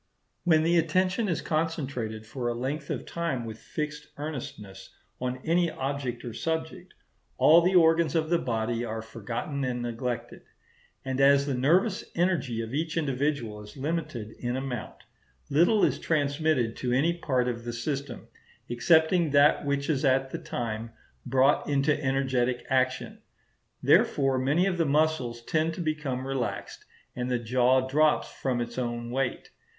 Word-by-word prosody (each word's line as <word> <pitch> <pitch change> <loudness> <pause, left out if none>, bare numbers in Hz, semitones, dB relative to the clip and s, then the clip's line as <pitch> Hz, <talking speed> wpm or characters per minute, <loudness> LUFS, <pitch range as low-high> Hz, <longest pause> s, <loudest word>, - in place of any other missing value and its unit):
When 160 -3 +4
the 170 +1 +4
attention 185 +6 +1
is 170 - -1
concentrated 135 -9 -2
for 120 +2 -4
a 120 - -1
length 135 +6 -3
of - - -3
time 160 -8 -3
with 110 -1 -7
fixed 150 -1 -5
earnestness 120 -10 -7 0.3
on 125 0 -3
any 170 +1 +2
object 135 -4 -4
or 120 - -5
subject, 160 +7 -4 0.4
all 165 +3 +7
the 180 +2 +2
organs 165 -2 +4
of 160 0 0
the 170 - +4
body 115 0 -1
are 110 -1 -4
forgotten 115 +5 -4
and 125 -2 -2
neglected; 120 +1 -4 0.6
and 130 0 -1
as 140 0 +5
the 140 - -1
nervous 175 - +2
energy 165 -10 0
of 115 +2 -7
each 160 +3 -2
individual 135 -7 -1
is 105 +3 -12
limited 150 -6 -3
in 120 0 -2
amount, 130 -3 -5 0.5
little 175 +8 +4
is - - 0
transmitted 145 -5 +1
to 125 - -2
any 145 +7 +3
part 130 -7 0
of 120 -1 -3
the 120 - -4
system, 140 +4 -4 0.4
excepting 160 +6 +3
that 145 +1 +4
which 140 0 0
is 145 -3 0
at 135 -1 +2
the - - -4
time 115 -1 -4 0.4
brought 135 +4 +3
into 145 +1 +1
energetic 130 -2 0
action. 130 -1 0 0.6
Therefore 135 -2 +3
many 145 +8 +2
of 185 -3 -1
the 165 - +3
muscles 140 -6 +1
tend 160 +4 0
to - - -5
become 150 -5 -2
relaxed, 135 -2 -4 0.3
and 125 0 -3
the 125 - +1
jaw 125 +2 +2
drops 150 +3 +2
from 125 -3 -1
its 120 +1 -4
own 120 -1 -3
weight. 130 0 -2
135 Hz, 155 wpm, -27 LUFS, 120-155 Hz, 0.6 s, all